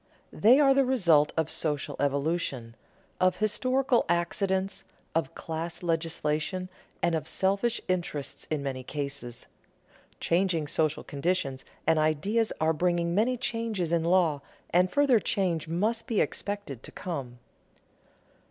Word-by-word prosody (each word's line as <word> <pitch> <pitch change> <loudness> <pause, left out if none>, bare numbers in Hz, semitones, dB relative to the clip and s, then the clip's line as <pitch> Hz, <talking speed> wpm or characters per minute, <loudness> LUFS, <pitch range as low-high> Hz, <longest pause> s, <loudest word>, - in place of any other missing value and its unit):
They 245 +6 +6
are 275 -2 +6
the 275 0 +4
result 175 - +3
of 160 -1 0
social 150 -3 -1
evolution, 140 -4 -1 0.4
of 185 0 +3
historical 255 +5 +2
accidents, 190 +3 0 0.3
of 160 -5 -1
class 165 +2 -4
legislation, 165 +1 -1 0.3
and 170 - +2
of 160 - -1
selfish 200 +5 +1
interest 170 -6 -3
in 150 -3 -1
many 135 -2 -3
cases. 140 -3 -5 0.7
Changing 170 -2 +1
social 155 +1 0
conditions 140 -3 -2 0.2
and 160 -1 +3
ideas 195 +9 +1
are 160 +1 +2
bringing 170 +1 +1
many 235 +6 +2
changes 230 -8 -2
in 170 -1 +2
law, 170 -4 +3 0.3
and 180 +1 +4
further 280 -3 +4
change 180 -8 0
must 215 +8 -1
be 230 -5 +1
expected 200 - -2
to - - -10
come. 135 -9 -5
170 Hz, 125 wpm, -28 LUFS, 150-200 Hz, 0.7 s, They